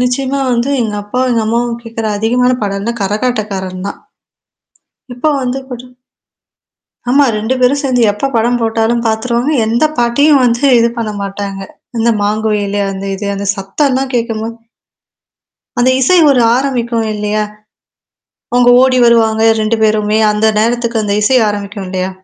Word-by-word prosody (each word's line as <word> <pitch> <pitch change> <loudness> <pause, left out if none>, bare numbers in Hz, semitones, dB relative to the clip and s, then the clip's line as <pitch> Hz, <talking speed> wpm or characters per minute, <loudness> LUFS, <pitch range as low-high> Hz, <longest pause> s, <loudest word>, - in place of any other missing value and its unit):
நிச்சயமா 260 +2 -1
வந்து 245 +3 0
எங்க 215 -2 -3
அப்பா, 205 +5 -4
எங்க 230 -2 +1
அம்மாவும் 235 +1 -1
கேட்கற 225 -1 -5
அதிகமான 245 +4 +1
பாடல் 200 -1 -2
வந்து 235 +3 -4
கரகாட்டக்காரன் 200 -3 -3
தான். - - -8 1.2
இப்போ 280 +6 0
வந்துக்கூட 255 -1 -5 1.2
ஆமா. 280 +3 +4
2 220 +4 -1
பேரும் 260 +3 +2
சேர்ந்து 255 -3 +1
எப்ப 240 +7 -3
படம் 240 +2 +1
போட்டாலும் 225 +1 0
பார்த்துருவாங்க. 235 +4 0 0.2
எந்த 235 +7 +1
பாட்டியும் 275 +5 +3
வந்து 235 +2 +1
இது 235 0 +2
பண்ண 220 -2 -3
மாட்டாங்க. 195 0 -5 0.4
இந்த 235 +1 +2
மாங்குயிலே 205 -1 -1
அந்த 195 0 -6
இது 205 +1 -5
அந்த 200 0 -5
சத்தம்ல்லாம் 260 +7 -1
கேட்கும்போது 230 -1 -2 1.2
அந்த 250 +1 +4
இசை 265 +8 +3 0.2
ஒரு 265 -3 +3 0.2
ஆரம்பிக்கும் 240 -4 -1
இல்லையா, 210 0 -1 1.1
அவங்க 245 0 +4
ஓடி 260 -1 +3
வருவாங்க 225 -2 +3 0.2
2 215 +1 0
பேருமே 215 0 +1
அந்த 210 +1 +1
நேரத்துக்கு 235 0 0
அந்த 205 -1 -1
இசை 255 +5 +3
ஆரம்பிக்கும் 205 -1 -4
இல்லையா? 185 0 -2
230 Hz, 140 wpm, -13 LUFS, 210-250 Hz, 1.2 s, ஆமா